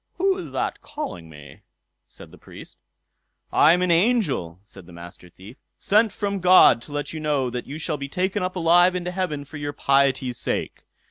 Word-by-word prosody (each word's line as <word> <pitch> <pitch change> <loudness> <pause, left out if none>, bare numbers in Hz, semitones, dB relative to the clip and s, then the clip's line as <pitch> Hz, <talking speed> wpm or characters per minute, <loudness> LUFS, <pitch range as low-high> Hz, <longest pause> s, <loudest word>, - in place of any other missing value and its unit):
"Who 385 +1 +1
is - - -8
that - - -3
calling 295 - -7
me?" 75 -3 -14 0.5
said - - -15
the - - -16
Priest. - - -14 0.7
"I 155 - +5
am 180 +1 +1
an 180 - +1
angel", 170 - 0
said 95 -4 -15
the - - -14
Master 85 +1 -12
Thief, 100 - -15 0.2
"sent 215 +1 +2
from 200 -1 -3
God 180 -10 +6
to 145 - -14
let 145 0 -4
you 160 - -5
know 145 -5 -1
that 125 0 -6
you 145 - -7
shall 160 -1 -3
be 140 0 -7
taken 185 +6 -2
up 185 +1 -3
alive 175 +1 +4
into 180 0 -3
heaven 180 -6 -4
for 145 +2 -10
your 145 0 -5
piety's 135 -3 +1
sake. - - -4
150 Hz, 195 wpm, -23 LUFS, 125-185 Hz, 0.7 s, God